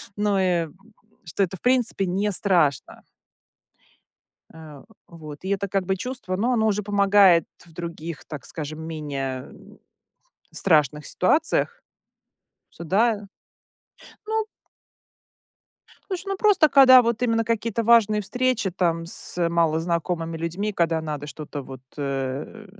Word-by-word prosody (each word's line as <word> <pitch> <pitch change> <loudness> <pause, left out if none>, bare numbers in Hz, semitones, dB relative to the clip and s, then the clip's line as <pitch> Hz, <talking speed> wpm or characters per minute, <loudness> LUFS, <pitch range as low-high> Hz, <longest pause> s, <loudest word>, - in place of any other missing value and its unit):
Ну 205 -1 +1
и 175 -3 +1 0.6
что 160 - -3
это, 190 0 -3
в - - -24
принципе, 245 -6 +1
не 195 +3 -1
страшно. 170 -9 0 1.5
Э. 155 -3 -12 0.2
Вот. 155 -1 -11
И - - -4
это 200 0 -1
как 195 -1 -1
бы 190 0 0
чувство, 235 -4 -5
ну, 235 +6 0
оно 220 -3 +2
уже 210 -1 0
помогает 200 -4 +4 0.2
в 170 - -19
других, 170 -2 -7
так 150 -3 -8
скажем, 155 0 -7
менее 140 -5 -5 1.0
страшных 150 -4 +1
ситуациях. 305 - +1 0.9
Со 170 - -10
да. 205 +4 +1 1.0
Ну 440 0 -1 1.6
Слушай, 375 -1 -5
ну 390 - -2
просто, 390 -6 +4
когда 260 -3 +8
вот 235 0 -1
именно 225 -2 +1
какие-то 230 0 -1
важные 215 -2 +4
встречи 245 -2 -1
там 165 -2 -1
с 170 0 -3
малознакомыми 165 0 -1
людьми, 175 +6 -3
когда 165 -3 0
надо 150 -2 -5
что-то 145 -1 -7
вот, 130 -1 -10 0.2
э, 140 +9 -4
185 Hz, 125 wpm, -24 LUFS, 160-220 Hz, 1.6 s, когда